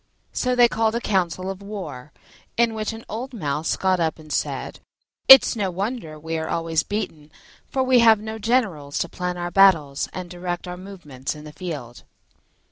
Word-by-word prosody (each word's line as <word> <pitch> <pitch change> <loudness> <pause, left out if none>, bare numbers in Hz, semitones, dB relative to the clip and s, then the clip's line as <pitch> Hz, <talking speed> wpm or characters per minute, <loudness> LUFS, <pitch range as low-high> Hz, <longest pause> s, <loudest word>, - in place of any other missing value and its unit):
So 250 -1 0
they 245 -1 +7
called 225 -1 0
a - - +1
council 185 -5 -1
of 195 0 -9
war, 190 -10 -7 0.5
in 235 -1 +3
which 215 0 -3
an 225 0 -10
old 250 +5 -6
Mouse 150 -4 -1
got 185 -1 +1
up 160 -2 0
and 155 -2 -8
said, - - -3 0.5
"It's 265 -2 +9
no 200 -4 -1
wonder 190 -3 -4
we 160 +1 -4
are 160 - -4
always 165 -1 0
beaten, 160 -8 -5 0.4
for 265 - 0
we 255 -1 +4
have 225 -2 +6
no 220 +1 -6
generals 200 - 0
to - - 0
plan 180 +1 -4
our 175 0 -4
battles 165 -8 +4
and 185 -1 -6
direct 175 0 -5
our 180 - -5
movements 175 -9 -7
in 150 - -11
the 150 0 -11
field." 145 -11 -7
185 Hz, 185 wpm, -23 LUFS, 160-220 Hz, 0.5 s, It's